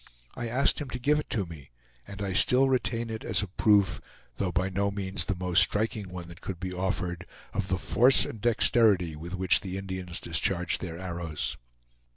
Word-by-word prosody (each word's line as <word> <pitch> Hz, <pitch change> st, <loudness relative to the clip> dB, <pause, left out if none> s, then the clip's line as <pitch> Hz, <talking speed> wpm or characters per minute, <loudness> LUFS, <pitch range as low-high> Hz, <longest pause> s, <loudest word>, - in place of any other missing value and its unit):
I 120 Hz, -, -5 dB
asked 135 Hz, +6 st, +2 dB
him 145 Hz, -, -6 dB
to 125 Hz, -, -4 dB
give 150 Hz, +4 st, +2 dB
it -, -, -7 dB
to 100 Hz, -5 st, -1 dB
me, 80 Hz, -5 st, -12 dB, 0.4 s
and 100 Hz, 0 st, -7 dB
I 95 Hz, -2 st, -2 dB
still 125 Hz, +7 st, +5 dB
retain 115 Hz, -2 st, -1 dB
it 110 Hz, -, -6 dB
as -, -, 0 dB
a -, -, -4 dB
proof, 100 Hz, 0 st, +2 dB, 0.4 s
though 90 Hz, -, -1 dB
by 90 Hz, +2 st, 0 dB
no 100 Hz, +1 st, -1 dB
means 100 Hz, -1 st, -2 dB
the 100 Hz, -, -2 dB
most 90 Hz, 0 st, +3 dB
striking 105 Hz, -2 st, +1 dB
one 90 Hz, -1 st, -8 dB
that 85 Hz, +3 st, -13 dB
could 95 Hz, -3 st, -6 dB
be 90 Hz, 0 st, -5 dB
offered, 90 Hz, -2 st, -3 dB, 0.3 s
of 100 Hz, -, -2 dB
the 95 Hz, -, 0 dB
force 125 Hz, +7 st, +4 dB
and 110 Hz, -, -8 dB
dexterity 105 Hz, -7 st, +3 dB
with 85 Hz, +4 st, -7 dB
which 95 Hz, -1 st, +4 dB
the 95 Hz, -1 st, -5 dB
Indians 95 Hz, -2 st, -5 dB
discharge 85 Hz, +1 st, 0 dB
their 85 Hz, -3 st, -6 dB
arrows. 85 Hz, -4 st, -4 dB
95 Hz, 195 wpm, -28 LUFS, 90-110 Hz, 0.4 s, still